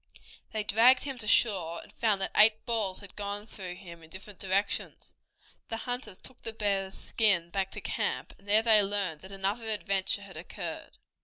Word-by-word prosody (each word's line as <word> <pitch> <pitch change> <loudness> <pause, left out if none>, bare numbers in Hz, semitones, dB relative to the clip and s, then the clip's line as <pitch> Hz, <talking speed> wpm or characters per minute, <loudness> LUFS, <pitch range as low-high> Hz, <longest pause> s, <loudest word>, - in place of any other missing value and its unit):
They 215 -1 -2
dragged 235 +5 +5
him 270 -3 -5
to 215 - -3
shore, 185 -7 +2
and - - -17
found 215 -4 +1
that - - -1
eight 215 +1 +6
balls 210 -5 -1
had 200 -2 -12
gone 205 0 -4
through 185 -5 -8
him 170 -3 -12
in 160 - -15
different 190 +3 -11
directions. 195 +1 -2 0.6
The 225 - -3
hunters 240 -4 -5
took 260 - -12
the 225 - -3
bear's 195 -3 -1
skin 190 -7 +2
back 195 0 -1
to - - -8
camp, - - -2
and 200 - -22
there 215 +2 +5
they 220 -2 +7
learned 195 -6 -1
that 190 - -10
another 200 +4 -2
adventure 200 -1 0
had 200 - -12
occurred. - - -7
205 Hz, 185 wpm, -29 LUFS, 190-220 Hz, 0.6 s, they